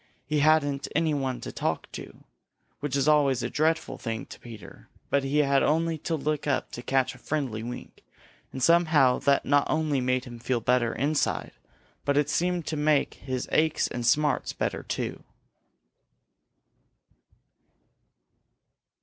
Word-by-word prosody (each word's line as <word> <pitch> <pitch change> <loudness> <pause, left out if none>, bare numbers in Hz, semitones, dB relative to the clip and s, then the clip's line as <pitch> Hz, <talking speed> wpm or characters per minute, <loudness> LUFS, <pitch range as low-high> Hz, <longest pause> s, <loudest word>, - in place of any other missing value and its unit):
He 150 -1 0
hadn't 145 -2 +3
anybody 145 -5 0
to - - -6
talk - - -2
to, - - -10 0.6
which 145 -2 -3
is 140 0 +1
always 145 -4 +3
a - - -3
dreadful 160 +1 0
thing 115 -3 -4
to - - -12
Peter, 115 -3 -12 0.2
but 140 -1 +2
he 135 +2 -1
had 140 0 +3
only 160 +1 +1
to 165 +2 -2
look 150 0 -2
up 140 - 0
to 120 - -6
catch 130 +1 +1
a 130 - -15
friendly 130 -7 -2
wink, 120 +2 -8 0.5
and 130 - -4
somehow 155 -6 +4
that 140 0 +2
not 145 0 +3
only 155 -3 +1
made 125 0 0
him 120 -2 -9
feel 120 +1 -1
better 120 0 +2
inside 145 +4 0 0.5
but 140 0 +1
it 145 0 +2
seemed 175 0 0
to 155 - -3
make 150 -1 +2
his 130 -2 -4
aches 155 0 +2
and 120 - -4
smarts 145 +4 +2
better - - -2
too. - - -4
140 Hz, 150 wpm, -27 LUFS, 130-155 Hz, 0.6 s, somehow